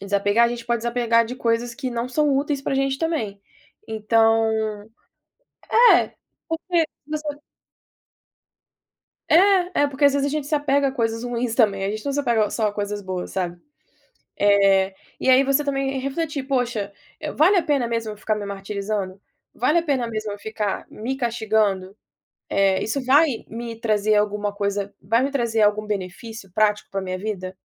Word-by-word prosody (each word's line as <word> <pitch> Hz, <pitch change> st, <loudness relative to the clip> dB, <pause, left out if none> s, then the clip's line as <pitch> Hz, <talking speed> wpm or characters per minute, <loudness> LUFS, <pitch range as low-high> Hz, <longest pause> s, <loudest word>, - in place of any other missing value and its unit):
desapegar, 205 Hz, +3 st, +2 dB
a -, -, -1 dB
gente 235 Hz, -1 st, -6 dB
pode 235 Hz, -1 st, 0 dB
desapegar 235 Hz, 0 st, +2 dB
de 245 Hz, +2 st, -6 dB
coisas 235 Hz, 0 st, -1 dB
que 260 Hz, -1 st, -4 dB
não 235 Hz, 0 st, -2 dB
são 285 Hz, +1 st, +2 dB
úteis 285 Hz, 0 st, -1 dB
pra -, -, -1 dB
gente 270 Hz, 0 st, 0 dB
também. 230 Hz, -12 st, -2 dB, 0.5 s
Então 225 Hz, +1 st, +3 dB, 1.5 s
é, -, -, +2 dB, 0.3 s
porque 325 Hz, 0 st, 0 dB, 0.2 s
você 300 Hz, -1 st, -4 dB, 1.9 s
É. 365 Hz, -1 st, +4 dB
É -, -, +4 dB
porque 280 Hz, +1 st, -1 dB
às 280 Hz, -, +6 dB
vezes 280 Hz, 0 st, +1 dB
a -, -, -1 dB
gente 300 Hz, -1 st, -2 dB
se 305 Hz, -, -1 dB
apega 285 Hz, -1 st, +2 dB
a 265 Hz, -, -4 dB
coisas 230 Hz, -3 st, -1 dB
ruins 240 Hz, -1 st, -2 dB
também. 200 Hz, -5 st, +2 dB
A 195 Hz, -, 0 dB
gente 215 Hz, +1 st, -5 dB
não 280 Hz, -, -1 dB
se 290 Hz, -, 0 dB
apega 225 Hz, -6 st, +1 dB
só 220 Hz, -, 0 dB
a -, -, -5 dB
coisas 205 Hz, 0 st, -3 dB
boas, 185 Hz, -2 st, -5 dB
sabe? 175 Hz, -2 st, -3 dB, 0.8 s
Eh, 195 Hz, -1 st, +4 dB, 0.2 s
e -, -, +2 dB
aí 260 Hz, +1 st, +7 dB
você 275 Hz, +2 st, +1 dB
também 275 Hz, -1 st, -1 dB
é -, -, -1 dB
refletir: 280 Hz, +1 st, -3 dB
"Poxa, 240 Hz, -7 st, -1 dB, 0.4 s
vale 360 Hz, +7 st, +5 dB
a 350 Hz, -, +3 dB
pena 275 Hz, -5 st, 0 dB
mesmo 230 Hz, -2 st, -2 dB
eu -, -, -10 dB
ficar 215 Hz, +1 st, -1 dB
me 210 Hz, -, -4 dB
martirizando? 200 Hz, -1 st, -4 dB, 0.3 s
Vale 295 Hz, +8 st, +2 dB
a -, -, +1 dB
pena 275 Hz, -7 st, 0 dB
mesmo 215 Hz, -2 st, -4 dB
eu 205 Hz, -, -7 dB
ficar 215 Hz, -1 st, -3 dB
me 245 Hz, +5 st, -4 dB
castigando? 215 Hz, -6 st, 0 dB, 0.5 s
Eh, 195 Hz, -1 st, +2 dB
isso 265 Hz, +5 st, -2 dB
vai 285 Hz, +6 st, +5 dB, 0.2 s
me 230 Hz, 0 st, -6 dB
trazer 215 Hz, -2 st, +1 dB
alguma 210 Hz, 0 st, 0 dB
coisa 200 Hz, 0 st, -2 dB
vai 230 Hz, +6 st, +2 dB
me 275 Hz, -, -1 dB
trazer 235 Hz, -5 st, 0 dB
algum 210 Hz, 0 st, +2 dB
benefício 200 Hz, +1 st, -6 dB
prático 210 Hz, +1 st, +1 dB
pra 195 Hz, 0 st, -2 dB
minha 185 Hz, -1 st, -4 dB
vida? 185 Hz, -2 st, -5 dB
230 Hz, 175 wpm, -23 LUFS, 205-275 Hz, 1.9 s, aí